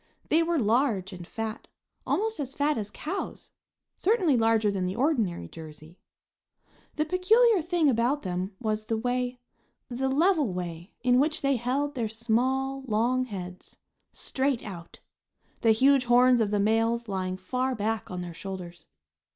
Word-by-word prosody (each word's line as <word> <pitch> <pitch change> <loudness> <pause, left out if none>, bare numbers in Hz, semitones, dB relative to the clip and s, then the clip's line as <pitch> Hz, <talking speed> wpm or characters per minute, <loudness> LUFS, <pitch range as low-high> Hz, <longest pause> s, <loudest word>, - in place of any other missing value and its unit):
They 320 - +4
were 335 0 +1
large 220 -5 +1
and 175 -2 -9
fat, 225 0 -5 0.4
almost 440 -2 0
as 275 -2 -4
fat 290 +1 +1
as 210 -2 -4
cows; 330 - -6 0.5
certainly 375 - +2
larger 225 -2 +3
than 190 -2 -1
the 185 - -3
ordinary 230 - 0
Jersey. 155 - -12 1.0
The 305 - 0
peculiar 395 +5 +4
thing 340 -1 +1
about 255 +3 +1
them 185 +1 -3
was 215 -2 -2
the 225 0 -1
way, 250 +2 -1 0.5
the 260 +2 -1
level 300 - +2
way, 175 +1 -6
in 250 0 +4
which 300 +2 0
they 275 0 +3
held 265 +5 -1
their 235 -5 -2
small, 255 +5 0
long 240 +4 +1
heads 185 -5 -8 0.3
straight 265 -2 -1
out; 175 -5 -9 0.6
the 225 - +3
huge 265 +3 +4
horns 245 0 +5
of 215 - +1
the 205 0 0
males 225 +3 +1
lying 185 -2 -2
far 255 +7 -2
back 220 0 -2
on 180 -1 -4
their 175 -1 -6
shoulders. 175 -2 -8
235 Hz, 150 wpm, -27 LUFS, 200-275 Hz, 1.0 s, horns